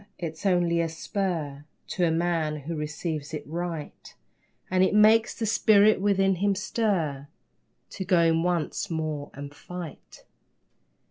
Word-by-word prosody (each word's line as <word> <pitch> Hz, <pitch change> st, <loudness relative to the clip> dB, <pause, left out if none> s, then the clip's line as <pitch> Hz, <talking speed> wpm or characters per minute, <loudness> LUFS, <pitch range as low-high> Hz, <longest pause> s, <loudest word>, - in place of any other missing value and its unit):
It's 165 Hz, +3 st, -4 dB
only 175 Hz, -2 st, +2 dB
a 165 Hz, -, -1 dB
spur 160 Hz, -4 st, -3 dB, 0.3 s
To 180 Hz, -, -1 dB
a 170 Hz, -, +4 dB
man 160 Hz, -2 st, 0 dB
who 165 Hz, +4 st, -5 dB
receives 150 Hz, 0 st, -4 dB
it 150 Hz, -, -6 dB
right, 165 Hz, -1 st, -6 dB, 0.6 s
And 185 Hz, 0 st, +4 dB
it 190 Hz, -, +2 dB
makes 220 Hz, +2 st, +5 dB
the 225 Hz, -, -2 dB
spirit 215 Hz, -1 st, +4 dB
within 195 Hz, -2 st, +2 dB
him 200 Hz, +2 st, +1 dB
stir 180 Hz, -, -1 dB, 0.6 s
To -, -, -5 dB
go 180 Hz, -2 st, +4 dB
in 165 Hz, 0 st, +3 dB
once 175 Hz, +2 st, -1 dB
more 155 Hz, -3 st, -3 dB
and 140 Hz, +1 st, -8 dB
fight. 175 Hz, 0 st, -9 dB
170 Hz, 140 wpm, -26 LUFS, 155-195 Hz, 0.6 s, makes